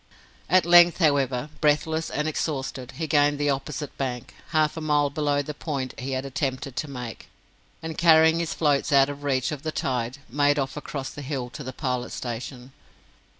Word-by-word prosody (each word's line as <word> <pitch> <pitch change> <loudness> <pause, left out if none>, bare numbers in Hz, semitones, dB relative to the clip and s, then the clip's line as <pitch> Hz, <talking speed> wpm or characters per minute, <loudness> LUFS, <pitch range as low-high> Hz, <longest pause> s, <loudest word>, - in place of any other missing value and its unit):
At 185 +1 +4
length, 175 0 +7
however, 140 -4 +1
breathless 160 +1 +1
and 150 +2 -2
exhausted, 135 -4 -3
he 165 - -3
gained 145 -1 +3
the 145 0 +1
opposite 140 +2 -4
bank, 125 -3 -4 0.2
half 155 -2 +2
a 160 - -5
mile 150 -2 +2
below 145 -1 0
the 150 - -6
point 140 -4 -4
he 135 +1 -4
had 130 +1 -2
attempted 135 -1 -3
to 155 - -2
make, 125 -4 -7 0.6
and 160 -1 -4
carrying 160 -1 +6
his 170 -2 -2
floats 145 -3 +1
out 135 0 +5
of 145 0 -7
reach 130 -2 0
of 150 -3 -5
the 155 - -3
tide, 130 -5 -2
made 145 +3 +2
off 135 -1 -2
across 140 -2 -5
the 145 - -8
hill 130 -3 -4
to 145 - -8
the 130 - -5
Pilot 125 -3 -3
Station. 125 +2 -6
145 Hz, 185 wpm, -25 LUFS, 130-155 Hz, 0.6 s, length